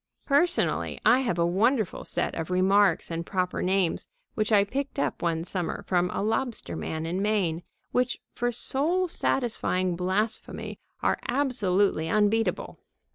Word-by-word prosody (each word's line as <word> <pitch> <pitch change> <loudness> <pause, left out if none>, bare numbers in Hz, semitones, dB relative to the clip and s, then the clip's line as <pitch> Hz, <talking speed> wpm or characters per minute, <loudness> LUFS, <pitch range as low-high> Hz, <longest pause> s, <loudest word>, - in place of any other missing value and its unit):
Personally, 295 +5 +1
I 255 - +6
have 235 -9 -1
a 170 - +3
wonderful 215 +4 +1
set - - -1
of 165 +1 -4
remarks 190 -1 +3
and 165 0 -2
proper 180 0 -2
names 185 -2 0 0.3
which 215 -1 -1
I 205 -2 +6
picked 275 +7 -4
up - - -1
one 165 -1 0
summer 180 -1 -3
from 180 -1 +1
a - - -2
lobster 225 +2 -1
man 160 0 -4
in 175 +4 -2
Maine, 195 -6 0 0.3
which 250 0 0
for 245 0 -1
soul 315 +10 0
satisfying 185 - 0
blasphemy 190 +6 -2 0.2
are - - +2
absolutely 205 - +1
unbeatable. 210 0 +1
200 Hz, 140 wpm, -27 LUFS, 180-245 Hz, 0.3 s, I